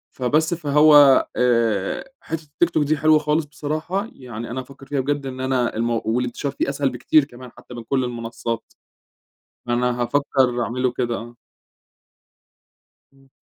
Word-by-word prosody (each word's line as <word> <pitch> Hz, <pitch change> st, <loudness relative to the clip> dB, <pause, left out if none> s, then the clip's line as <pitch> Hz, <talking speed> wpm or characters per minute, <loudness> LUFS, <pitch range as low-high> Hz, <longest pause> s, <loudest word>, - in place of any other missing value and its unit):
فبس، 155 Hz, +6 st, +1 dB
فهو، 150 Hz, -3 st, +6 dB
آآ، 115 Hz, -, 0 dB
حتّة 160 Hz, 0 st, -5 dB
التيك 155 Hz, +3 st, 0 dB
توك 155 Hz, -3 st, +1 dB
دي 150 Hz, +2 st, +1 dB
حلوة 155 Hz, +1 st, +4 dB
خالص 150 Hz, +1 st, 0 dB
بصراحة، 155 Hz, +8 st, -3 dB
يعني 120 Hz, -3 st, -8 dB
أنا 130 Hz, -, -3 dB
هافكّر 135 Hz, +1 st, -14 dB
فيها 140 Hz, 0 st, -2 dB
بجد 145 Hz, +1 st, -1 dB
إن 130 Hz, -1 st, -6 dB
أنا 130 Hz, -2 st, 0 dB
المو 115 Hz, 0 st, 0 dB
والانتشار 125 Hz, +4 st, -1 dB
فيه 140 Hz, -, -2 dB
أسهل 140 Hz, 0 st, 0 dB
بكتير 130 Hz, +4 st, +3 dB
كمان 125 Hz, -2 st, -13 dB
حتّى 125 Hz, -, -14 dB
مِن 120 Hz, -1 st, -7 dB
كل 130 Hz, +3 st, 0 dB
المنصات. 115 Hz, -1 st, -5 dB, 0.9 s
أنا 120 Hz, 0 st, 0 dB
هافكر 130 Hz, -1 st, +1 dB
أعمله 125 Hz, +3 st, -1 dB
كده، 120 Hz, -1 st, -2 dB
آه. 120 Hz, +1 st, -9 dB, 1.8 s
امم. 135 Hz, 0 st, -25 dB
130 Hz, 145 wpm, -22 LUFS, 120-145 Hz, 1.8 s, فهو